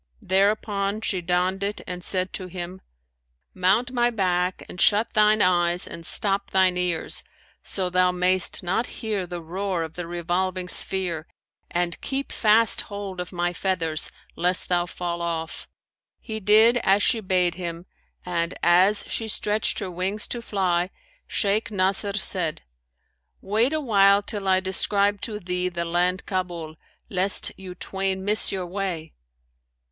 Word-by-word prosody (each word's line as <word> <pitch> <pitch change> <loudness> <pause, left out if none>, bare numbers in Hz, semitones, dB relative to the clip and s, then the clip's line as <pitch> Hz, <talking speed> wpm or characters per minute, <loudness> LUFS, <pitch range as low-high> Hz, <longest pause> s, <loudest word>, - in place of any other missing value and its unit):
There 195 +2 +4
upon 205 -1 -2
she 190 -4 -1
donned 180 +2 0
it 200 +1 -2
and 180 -1 -6
said 185 0 -2
to 185 - -5
him, 180 +1 -7 0.7
'Mount 200 +7 +2
my 240 -1 +2
back 185 -4 -1
and 180 - -5
shut 210 +2 +3
thine 215 0 +4
eyes 175 -1 +2
and 165 - -9
stop 200 -1 0
thine 190 -1 +3
ears, 180 -2 -1 0.4
so 190 -2 -3
thou 180 0 +3
mayst 180 +1 +2
not 195 +7 0
hear 210 -5 -3
the 175 -1 -6
roar 185 +1 -2
of 160 -1 -7
the 175 0 -6
revolving 180 +2 -2
sphere; 180 -4 0 0.4
and 175 -1 -1
keep 275 0 -3
fast 220 0 +3
hold 200 -2 -6
of 180 - -5
my 175 -1 -1
feathers, 165 -4 0 0.2
lest 180 +1 0
thou 175 -1 +1
fall 170 0 -4
off.' 165 -1 -4 0.5
He 220 -2 -5
did 220 +4 +5
as 205 -3 +3
she 230 - +3
bade 180 -3 +2
him 170 -1 -6 0.4
and, 170 -1 -1
as 185 +4 +5
she 225 - -2
stretched 210 0 -1
her 190 -3 -4
wings 190 +4 -1
to 240 - -3
fly, 185 -5 0 0.4
Shaykh 205 +1 0
Nasr 200 0 +1
said, 180 -6 +2 0.8
'Wait 220 +7 +1
a 315 - 0
while 200 -6 +4
till 205 -1 -3
I 185 0 +4
describe 200 +1 +1
to 210 -2 -4
thee 180 -1 -2
the 170 -1 -3
land 180 +2 0
Kabul, 175 -4 -4 0.3
lest 190 +1 0
you 185 -2 -9
twain 190 +1 -3
miss 210 +1 +4
your 190 -2 -3
way.' 175 -4 -4
185 Hz, 150 wpm, -24 LUFS, 175-205 Hz, 0.8 s, did